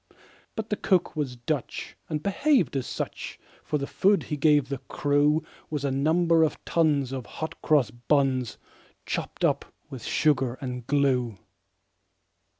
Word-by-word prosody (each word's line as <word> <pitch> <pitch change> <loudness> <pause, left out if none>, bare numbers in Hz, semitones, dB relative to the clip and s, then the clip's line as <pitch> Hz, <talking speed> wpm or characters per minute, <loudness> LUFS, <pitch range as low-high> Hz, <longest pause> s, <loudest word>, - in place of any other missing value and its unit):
But 220 -1 -4
the 210 - +1
cook 180 -5 +1
was 140 -5 -2
Dutch, 125 +3 -4
and 155 -1 -2
behaved 200 - +2
as 130 -2 -1
such; - - -5 0.2
For 150 - -1
the 140 - -2
food 195 +7 +3
that - - -10
he 150 - 0
gave 145 -2 +4
the 140 -2 -3
crew 145 +3 +1 0.3
Was 150 -2 -2
a 140 - +1
number 165 +4 +3
of 160 - 0
tons 150 -6 +2
of 130 -3 -5
hot 160 - -6
cross 145 -8 +3
buns, 130 0 +1 0.5
Chopped - - -2
up - - +2 0.3
with 130 -4 -7
sugar 135 -5 +2
and 125 -3 -5
glue. 130 -6 +2
145 Hz, 150 wpm, -27 LUFS, 130-160 Hz, 0.5 s, gave